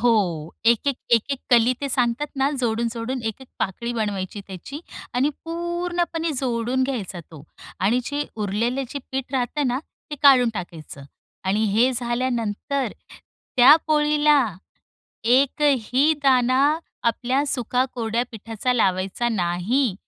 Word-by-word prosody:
हो. 185 -10 +1
एक-एक, 235 +4 +3
एक-एक 240 +4 +2
कली 240 0 +5
ते 280 - -2
सांगतात 245 +2 +1
ना, 270 +1 +2
जोडून-जोडून 235 +1 -2
एक-एक 245 +4 -5
पाकळी 235 +5 -2
बनवायची 205 -3 -3
त्याची 195 - -8 0.3
आणि 265 +4 +2
पूर्णपणे 345 0 -2
जोडून 245 0 0
घ्यायचा 205 -9 -4
तो 155 -4 -11 0.4
आणि 210 +6 +3
जे 290 +2 -2
उरलेले 225 +6 -1
जे 285 - -5
पीठ 265 0 -3
राहत 260 +2 -1
ना, 250 +1 0 0.3
ते - - -3
काढून 260 -4 +7
टाकायचं. 165 -6 -7 0.4
आणि 205 +3 +1
हे 235 +5 +4
झाल्यानंतर, 240 0 -2 0.6
त्या 255 +4 +9
पोळीला, 300 -1 +4 0.9
एकही 270 +2 +3
दाणा 255 -1 +4 0.4
आपल्या 250 +4 +1
सुका 250 -2 +1
कोरड्या 230 0 -1
पिठाचा 225 +2 -3
लावायचा 195 +1 +1
नाही. 200 +4 0
245 Hz, 120 wpm, -23 LUFS, 220-275 Hz, 0.9 s, त्या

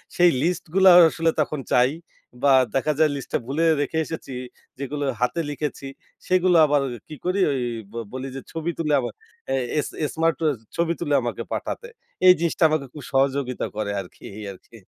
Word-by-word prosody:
সেই 175 0 +6
লিস্ট 175 +3 0
গুলা 190 -1 +7 0.2
আসলে 165 0 0
তখন 150 0 -2
চাই 125 +2 +4 0.5
বা 140 -1 +6 0.2
দেখা 150 +3 +1
যায় 155 -1 +5
লিস্টটা 135 - -3
ভুলে 145 +6 -1 0.2
রেখে 145 +3 -2
এসেছি 155 -5 -7 0.5
যেগুলো 145 +1 -3 0.2
হাতে 145 +7 +1
লিখেছি 145 -1 -4 0.4
সেগুলো 180 -1 +4
আবার 145 -1 +2 0.3
কি 155 - -8
করি 185 +2 0
ঐ - - +1 0.4
ব - - -20 0.2
বলি 130 +1 -4
যে 135 - -5
ছবি 165 +1 -2
তুলে 150 -3 0
আমার 120 -3 -4 0.4
অ্যা 135 - +1 0.2
এস - - -1 0.2
এস 150 - -1
স্মার্ট 165 0 +1
ও - - +4 0.3
ছবি 170 0 +1
তুলে 150 -4 -1
আমাকে - - -3
পাঠাতে। 480 - -4 0.4
এই 180 - +10
জিনিসটা 170 0 0
আমাকে 155 -3 0
খুব 150 - -9
সহযোগিতা 135 -1 0
করে 105 -1 -2
আরকি, 90 - -15
এই 105 - -7
আরকি। 110 +3 -17
150 Hz, 180 wpm, -23 LUFS, 135-165 Hz, 0.5 s, এই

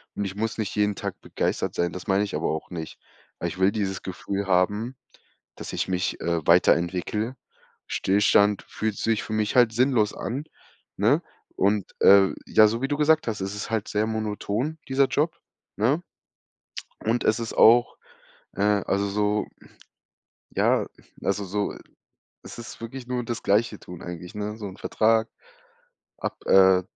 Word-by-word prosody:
und 100 - -2
ich 95 0 -5
muss 110 +1 -2
nicht 110 -3 -3
jeden 105 0 +2
Tag - - -5
begeistert - - -2
sein, 85 0 0
das 90 - -7
meine 100 +1 +3
ich 100 - -4
aber 80 - -1
auch 80 - -4
nicht. 80 -3 -7 0.4
Aber 85 - -2
ich 85 - -6
will 95 +2 +4
dieses 95 -3 -2
Gefühl 100 +2 -4
haben, 100 +6 +1 0.6
dass - - -8
ich - - -1
mich, 90 -1 -1
äh, 85 -2 -1
weiterentwickele. 90 +7 +2 0.5
Stillstand 100 +1 +3
fühlt 110 -2 -3
sich 115 -1 0
für 110 - -6
mich 110 -1 0
halt 120 -3 +5
sinnlos 120 -4 +2
an, 130 +5 -4 0.5
ne? - - +3 0.3
Und, 100 0 0
äh, 100 -1 +7
ja, 110 - +6
so 115 +3 -2
wie 135 - 0
du 145 - 0
gesagt 155 -1 +3
hast, 110 -2 -2
es 95 +1 -3
ist 105 - -5
halt 110 -2 -1
sehr 105 +1 0
monoton 110 +6 -2
dieser 135 +1 +4
Job, 160 +5 0 0.4
ne? 130 +10 +2 1.0
Und 115 +2 +1
es 110 - +3
ist 115 -1 -4
auch, 120 +2 +5 0.6
äh, - - -3
also 100 -1 +1
so 105 +1 0
hm, - - -18 0.8
ja, - - +2 0.4
also 100 +1 -1
so 100 +2 -2 0.7
es - - -11
ist 120 - -9
wirklich 120 +2 -7
nur 125 -1 -2
das 120 0 -4
Gleiche 105 +1 +2
tun 90 -1 -11
eigentlich, 90 +3 -8
ne, 105 +1 -4
so 110 -2 -6
'n 95 -1 -8
Vertrag 110 +1 +2 0.9
ab - - -4
äh, 95 -1 +6
105 Hz, 165 wpm, -25 LUFS, 95-115 Hz, 1.0 s, äh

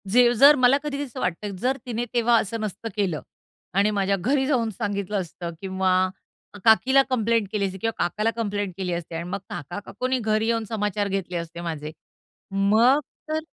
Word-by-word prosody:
जे 240 +3 +5
जर 280 +5 +8
मला 255 0 +5
कधी 285 -1 -3
असं 260 -5 -8
वाटतं, 190 +3 -2
जर 260 +2 +1
तिने 240 -1 -2
तेव्हा 240 -1 +4
असं 225 +2 -3
नसतं 215 +2 -4
केलं 190 -7 -1 0.6
आणि 205 +2 +4
माझ्या 200 -1 +1
घरी 265 +8 +1
जाऊन 245 -6 +1
सांगितलं 200 0 -3
असतं 170 0 -7
किंवा 185 -1 +1 0.6
काकीला 260 +5 +6
कंप्लेंट 230 -3 +1
केली 210 -2 0
असती 190 0 -4
किंवा 225 - +1
काकाला 215 +5 0
कंप्लेंट 205 -4 -2
केली 185 -2 -2
असती 170 -1 -5
आणि 165 - -3
मग 180 - -3
काका 165 +7 -6
काकूंनी 255 +4 -2
घरी 215 -1 +1
येऊन 230 -1 +1
समाचार 210 -2 -1
घेतले 190 -2 -2
असते 170 0 -6
माझे. 155 -3 -4 0.6
मग 215 +8 +4 0.3
तर 310 0 0
210 Hz, 175 wpm, -24 LUFS, 190-240 Hz, 0.6 s, जर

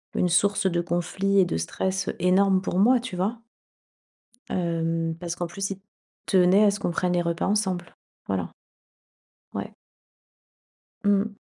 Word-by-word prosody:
une 180 - +2
source 200 +3 +2
de 170 0 +1
conflits 180 +3 -1
et 190 - +5
de 80 - -2
stress 190 - -2
énorme 185 +2 +3
pour 185 -1 -1
moi, 245 +5 +5
tu 235 -6 -6
vois? 205 +6 -1 1.1
Hem, 165 -2 -1
parce 170 -1 -4
qu'en 175 - -3
plus 195 +3 -4
il 190 - -5 0.5
tenait 190 +1 +5
à 200 - +5
ce 205 - -4
qu'on 175 - -1
prenne 180 +1 0
les 175 - +2
repas 170 0 -1
ensemble, 190 -4 -1 0.3
voilà. - - -2 1.0
Ouais. - - -5 1.3
Mmh. 205 +1 +1
185 Hz, 145 wpm, -25 LUFS, 175-200 Hz, 1.3 s, et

